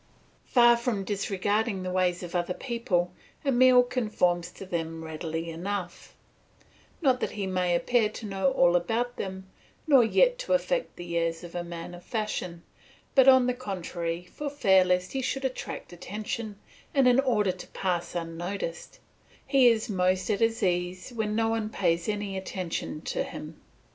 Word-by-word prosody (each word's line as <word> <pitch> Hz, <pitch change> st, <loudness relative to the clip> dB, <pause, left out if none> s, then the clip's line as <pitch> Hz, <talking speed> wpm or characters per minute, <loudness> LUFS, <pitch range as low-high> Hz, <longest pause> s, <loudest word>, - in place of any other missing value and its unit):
Far 240 Hz, -1 st, +6 dB
from 235 Hz, -4 st, -1 dB
disregarding 200 Hz, +1 st, -1 dB
the 185 Hz, -, -3 dB
ways 180 Hz, -1 st, +1 dB
of 175 Hz, -, -7 dB
other 180 Hz, 0 st, -1 dB
people, 190 Hz, -8 st, -1 dB, 0.3 s
Emile 255 Hz, -1 st, +6 dB
conforms 210 Hz, -8 st, 0 dB
to -, -, -9 dB
them 165 Hz, -2 st, -4 dB
readily 160 Hz, +1 st, -4 dB
enough; 180 Hz, +2 st, -5 dB, 0.9 s
not 260 Hz, -3 st, +4 dB
that -, -, -1 dB
he 200 Hz, -2 st, -3 dB
may 180 Hz, -2 st, +1 dB
appear 225 Hz, +4 st, +2 dB
to 215 Hz, -, -8 dB
know 195 Hz, +5 st, +1 dB
all 175 Hz, -9 st, +4 dB
about 230 Hz, +8 st, 0 dB
them, 190 Hz, 0 st, -5 dB, 0.4 s
nor 275 Hz, -5 st, +6 dB
yet -, -, +3 dB
to -, -, -1 dB
affect -, -, 0 dB
the 175 Hz, -1 st, -6 dB
airs 165 Hz, 0 st, -2 dB
of 175 Hz, -, -9 dB
a 175 Hz, -, -3 dB
man 170 Hz, 0 st, -7 dB
of 175 Hz, 0 st, -11 dB
fashion, 185 Hz, -6 st, -3 dB, 0.5 s
but 265 Hz, -1 st, +6 dB
on 260 Hz, -1 st, +7 dB
the 250 Hz, -, +1 dB
contrary 175 Hz, -7 st, -4 dB
for 285 Hz, +11 st, -6 dB
fear 190 Hz, -10 st, +4 dB
lest 180 Hz, 0 st, 0 dB
he 270 Hz, -, -2 dB
should 270 Hz, +1 st, -2 dB
attract 255 Hz, -7 st, -5 dB
attention, 210 Hz, +3 st, -5 dB, 0.4 s
and 270 Hz, -2 st, +5 dB
in 250 Hz, +1 st, +5 dB
order 220 Hz, -8 st, +2 dB
to 180 Hz, -, -10 dB
pass 180 Hz, -3 st, -2 dB
unnoticed; 170 Hz, +1 st, -5 dB, 0.5 s
he 270 Hz, -2 st, +5 dB
is 230 Hz, -1 st, +3 dB
most 185 Hz, -1 st, +1 dB
at 200 Hz, -, 0 dB
his 225 Hz, 0 st, +1 dB
ease 180 Hz, +3 st, -1 dB
when 220 Hz, -3 st, -2 dB
no 225 Hz, 0 st, +2 dB
one 225 Hz, -1 st, -1 dB
pays 170 Hz, -3 st, 0 dB
any 205 Hz, -2 st, -2 dB
attention 185 Hz, -4 st, -4 dB
to -, -, -2 dB
him. -, -, -7 dB
195 Hz, 165 wpm, -28 LUFS, 175-235 Hz, 0.9 s, on